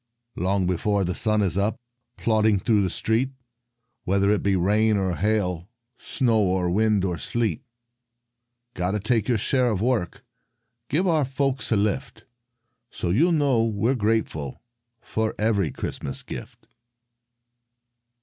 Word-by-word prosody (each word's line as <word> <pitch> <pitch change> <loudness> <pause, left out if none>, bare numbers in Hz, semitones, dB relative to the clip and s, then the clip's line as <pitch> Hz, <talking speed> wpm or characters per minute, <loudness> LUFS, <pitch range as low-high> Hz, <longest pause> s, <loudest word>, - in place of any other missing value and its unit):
Long 95 +1 0
before 95 +3 0
the 90 0 -1
sun 110 +1 +2
is 95 0 +1
up, 105 +4 0 0.4
Plodding 110 -2 +2
through 105 +1 +2
the 95 - 0
street, 115 +8 0 0.7
Whether 100 +2 +2
it 105 - +1
be 100 -1 +1
rain 105 +4 +2
or 95 -2 0
hail, 90 -3 -1 0.3
Snow 115 -4 +1
or 90 -2 +1
wind 105 0 +2
or 90 -3 -2
sleet. 120 -2 -2 1.1
Got 90 +2 -2
to 105 - 0
take 110 +3 0
our 120 - +3
share 125 +4 +1
of 105 -5 -1
work, 110 -6 -1 0.6
Give 175 +7 +1
our 160 -4 +3
folks 135 -1 -1
a - - +4
lift. 105 +4 -2 0.6
So 85 - -3
you'll 160 - +3
know 140 -7 +2
we're 115 +2 +1
grateful 105 - -2 0.4
for 110 0 -2
Every 105 -6 +1
Christmas 70 - -5
gift. - - -9
105 Hz, 140 wpm, -24 LUFS, 95-115 Hz, 1.1 s, a